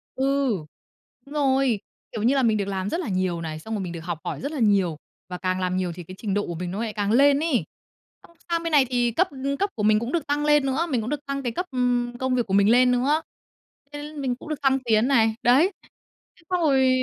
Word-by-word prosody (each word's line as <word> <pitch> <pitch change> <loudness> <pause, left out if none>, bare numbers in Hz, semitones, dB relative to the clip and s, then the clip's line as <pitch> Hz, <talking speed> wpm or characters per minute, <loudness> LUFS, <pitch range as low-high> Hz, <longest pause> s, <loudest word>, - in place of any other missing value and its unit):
Ừ, 265 - -2 1.0
đúng 280 - -12
rồi. 265 -5 +2 0.3
Kiểu 215 - -4
như 250 +5 +3
là 270 - +2
mình 220 -2 +3
được 200 - -1
làm 195 0 -2
rất 335 - -2
là 350 - -3
nhiều 185 -3 -1
này, 155 -1 -5
xong 220 +8 -7
rồi 205 - -2
mình 180 - -5
được 170 - -6
học 170 -3 -3
hỏi - - -4
rất 280 - -3
là 305 - -4
nhiều, 195 -8 +2 0.3
và 180 - -5
càng 185 0 -1
làm 185 0 -1
nhiều 185 -2 -1
thì 175 - -8
cái 185 +3 -11
trình 205 -4 -2
độ 205 +1 0
của 170 - -4
mình 175 +1 -4
nó 195 - -4
lại 220 -2 -4
càng 205 -1 -1
lên 280 +4 +5
ấy. 310 -8 +1 0.6
Xong, 340 - -25
sang 335 0 0
bên 335 - -2
này 290 -3 +5
thì 245 -2 +1
cấp 370 - +2 0.3
cấp 400 - +1
của 210 - -3
mình 215 0 +4
cũng 235 +3 -4
được 330 -3 -1
tăng 290 +1 0
lên 295 -2 +4
nữa, 275 +6 0
mình 250 -6 0
cũng 220 - -4
được 290 0 -4
tăng 275 0 -3
cái 240 - -1
cấp, 360 +11 -3
ừm, 245 -1 0
công 260 -1 0
việc 245 -2 +1
của 190 - -3
mình 200 +1 +5
lên 250 +2 +5
nữa, 275 +6 +2 0.7
thế 295 +1 -7
mình 265 -3 -1
cũng 260 - -12
được 305 -2 -3
thăng 270 0 +3
tiến 225 0 +3
này. 225 -5 +3
Đấy, 270 +11 +5 0.7
thế 335 - -23
xong 360 -1 +1
rồi 270 -4 +4
245 Hz, 265 wpm, -24 LUFS, 205-280 Hz, 1.0 s, lên